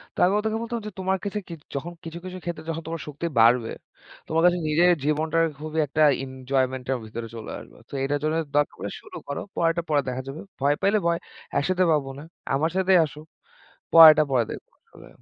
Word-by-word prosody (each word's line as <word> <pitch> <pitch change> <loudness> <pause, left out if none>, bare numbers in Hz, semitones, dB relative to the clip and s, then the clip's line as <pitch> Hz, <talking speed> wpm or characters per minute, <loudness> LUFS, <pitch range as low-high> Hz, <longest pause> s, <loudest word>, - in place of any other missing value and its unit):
তো - - -25
আমি 185 - +2
ওদেরকে 220 +1 -1
বলতাম 235 0 -3
যে, - - -6
তোমার 190 +1 0
কাছে 205 +1 -2
কি 170 - -7 0.2
যখন 165 +5 -4
কিছু 165 +1 -7
কিছু 185 0 -6
ক্ষেত্রে 170 -2 -5 0.2
তোমার 165 0 -4
শক্তি 150 +3 -5
বাড়বে, 115 0 +4 0.6
তোমার 160 +1 +1
কাছে 180 0 +4
নিজের 165 +4 +4 0.2
জীবনটাকে 160 +2 +1
খুবই 155 +1 -3
একটা 155 +3 +2 0.2
এনজয়মেন্ট 130 -1 -2
এর - - -1
ভিতরে 115 +1 -6
চলে 110 -1 -7
আসবে। - - -15
তো, - - -17
এটার 145 +1 0
জন্য 155 +1 +1 0.2
দরকার 145 0 +2
হলে, - - -4
শুরু - - -11
করো। 140 - -4
পরেরটা 165 0 +1
পরে 145 -2 +3
দেখা 125 +1 -3
যাবে। 140 +4 -6 0.2
ভয় 140 +1 +2
পাইলে 205 +2 +3
ভয়, 170 0 +1 0.4
একসাথে 185 +5 +1
পাবো 145 -3 +1
না। - - -9 0.3
আমার 155 +4 +1
সাথেই 190 -1 +4
আসো। 150 0 -10 0.7
পরেরটা 155 -2 +10
পরে 125 -3 +3
দেখবো। - - -9 0.2
বলে - - -15
155 Hz, 195 wpm, -25 LUFS, 140-175 Hz, 0.7 s, পরেরটা